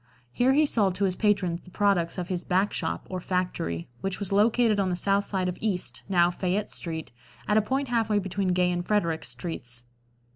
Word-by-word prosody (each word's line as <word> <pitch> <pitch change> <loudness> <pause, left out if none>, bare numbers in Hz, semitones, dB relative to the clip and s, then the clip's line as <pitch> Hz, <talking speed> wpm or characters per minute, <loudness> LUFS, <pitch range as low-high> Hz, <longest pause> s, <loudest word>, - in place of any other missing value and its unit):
Here 250 - +3
he 305 +2 +5
sold 205 -9 +1
to 195 - -1
his 185 -2 0
patrons 185 -5 +1
the - - -16
products 190 -3 +1
of 180 -1 -3
his 180 -1 -2
"back 190 +3 +1
shop" - - -3
or 185 - -4
factory, 180 - -2
which 195 -1 -2
was 200 -2 0
located 215 +1 +3
on 190 -2 +1
the 180 - 0
south 200 +2 +1
side 190 -2 -1
of 180 - -4
East, 180 - -2
now 175 -2 +4
Fayette 185 +3 -1
street, 160 -2 -5 0.4
at 210 - +2
a - - +6
point 265 +5 -1
half 230 -2 +1
way 210 - +3
between 195 0 -1
Gay 180 0 +2
and 175 0 -1
Frederick 170 -5 0
streets. 125 -9 -6
185 Hz, 210 wpm, -27 LUFS, 175-205 Hz, 0.4 s, a